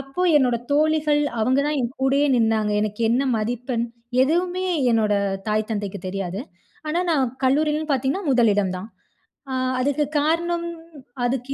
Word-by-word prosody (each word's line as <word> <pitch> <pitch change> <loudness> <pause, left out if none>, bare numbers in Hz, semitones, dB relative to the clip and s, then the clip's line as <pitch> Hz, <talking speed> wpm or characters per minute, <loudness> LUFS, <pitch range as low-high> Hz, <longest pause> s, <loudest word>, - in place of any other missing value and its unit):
அப்போ, 275 +6 -4
என்னோட 250 -4 +3 0.2
தோழிகள் 300 0 +2 0.2
அவங்க 255 +4 +2
தான் 300 -1 0
என் 235 0 -2
கூடயே 275 +2 +3
நின்னாங்க. 220 -2 +2
எனக்கு 210 +1 -3
என்ன 245 +3 +2
மதிப்பெண்? 235 +2 -2 0.4
எதுவுமே 355 +6 0 0.3
என்னோட 215 -2 +2 0.4
தாய் 215 +1 0
தந்தைக்கு 205 -2 -3
தெரியாது. 190 0 -4 0.5
ஆனா, 335 +3 0
நான் 280 -5 +2 0.2
கல்லூரிலன்னு 300 +3 +1
பாத்தீங்கன்னா, 270 +9 -1
முதலிடம் 205 -6 +2
தான். 200 +4 -8 0.6
அ, - - -2 0.3
அதுக்கு 285 +3 +1 0.2
காரணம் 340 +3 0 0.6
அதுக்கு 255 +2 -2
260 Hz, 135 wpm, -23 LUFS, 220-300 Hz, 0.6 s, என்னோட